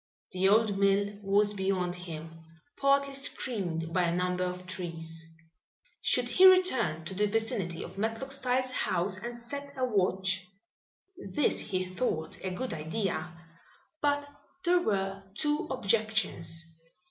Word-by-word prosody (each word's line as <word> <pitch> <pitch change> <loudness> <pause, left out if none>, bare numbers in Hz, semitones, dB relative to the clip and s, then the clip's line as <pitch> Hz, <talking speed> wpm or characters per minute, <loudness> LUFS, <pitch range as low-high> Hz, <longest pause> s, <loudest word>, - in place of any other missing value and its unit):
The 185 +1 +3
old 210 -1 +4
mill 200 +1 +2
was 205 +1 +3
beyond 190 -2 0
him, 165 -2 -8 0.3
partly 275 0 +3
screened 185 -11 -2
by 180 -1 +3
a 170 0 +1
number 180 0 0
of 180 0 -4
trees. 165 -3 -5 0.8
Should 245 -1 +2
he 365 +10 +7
return 260 - +4
to 190 - -4
the 210 +2 +2
vicinity 205 -5 -1
of - - -9
Matlock 225 +5 -2
Styles' 255 -1 0
house 185 -4 0
and 240 +3 -6
set 280 +4 -6
a 255 - +2
watch? 190 -4 +1 0.9
This 295 - +2
he 185 -3 -2
thought 185 -4 -2
a 190 - -1
good 215 +6 -3
idea, 175 +3 -2 0.7
but 290 0 +1 0.4
there 350 0 +4
were 195 - -1
two 295 +5 0
objections. 215 -8 0
200 Hz, 135 wpm, -30 LUFS, 180-250 Hz, 0.9 s, he